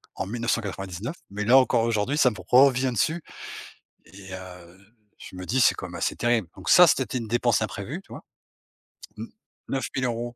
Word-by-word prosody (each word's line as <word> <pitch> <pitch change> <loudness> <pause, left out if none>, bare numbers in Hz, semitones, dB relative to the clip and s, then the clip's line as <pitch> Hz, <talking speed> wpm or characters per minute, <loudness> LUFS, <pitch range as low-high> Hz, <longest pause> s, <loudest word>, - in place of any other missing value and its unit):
en 95 - -3
1999. 110 - -3
Mais 105 +1 -4
là, 125 +4 +6
encore 125 -3 +3
aujourd'hui, 115 +5 0
ça 125 - +5
me - - -9
revient 130 0 +4
dessus 160 +8 0 0.9
et, 95 -1 -13
heu, 90 -1 -11 0.4
je - - -12
me 90 0 -7
dis: 130 +3 0
«C'est - - +5
quand - - -7
même 85 - -11
assez - - -2
terrible». 120 -6 0
Donc - - -8
ça, 180 - +8
c'était 130 -4 0
une 115 -2 -6
dépense 120 -1 +1
imprévue, 110 - -5
tu - - -17
vois. - - -9 1.0
N 110 - -6 0.4
neuf 135 -1 -2
mille 130 - 0
euros. 120 0 -3
115 Hz, 185 wpm, -25 LUFS, 100-130 Hz, 1.0 s, ça